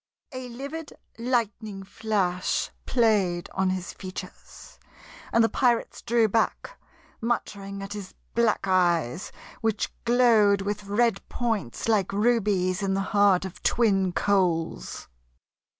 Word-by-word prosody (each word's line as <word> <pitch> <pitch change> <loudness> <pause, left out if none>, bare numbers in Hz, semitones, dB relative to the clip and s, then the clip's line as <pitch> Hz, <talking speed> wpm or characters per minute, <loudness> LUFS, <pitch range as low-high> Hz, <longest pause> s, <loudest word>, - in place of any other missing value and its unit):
A 255 -1 -6
livid 280 +6 -7 0.3
lightning 220 -4 -1
flash 195 -3 -1 0.2
played 205 -8 +2
on 190 0 +1
his 185 -1 -3
features, 185 0 -10 0.5
and 230 - +4
the - - +5
pirates 240 -1 +1
drew 235 -1 +3
back, 225 - -1 0.5
muttering 200 -4 -3
at 195 +1 -6
his 200 -3 -8 0.2
black 230 -3 +2
eyes 175 -4 +1 0.3
which 220 -2 0
glowed 225 -5 +4
with 205 +1 -3
red 210 0 +1
points 225 - -2
like 210 -5 +2
rubies 205 -4 +2
in 195 -1 0
the 195 - 0
heart 200 -2 +4
of 190 - -8
twin 195 -6 +2
coals. 180 -4 0
205 Hz, 120 wpm, -26 LUFS, 190-230 Hz, 0.5 s, the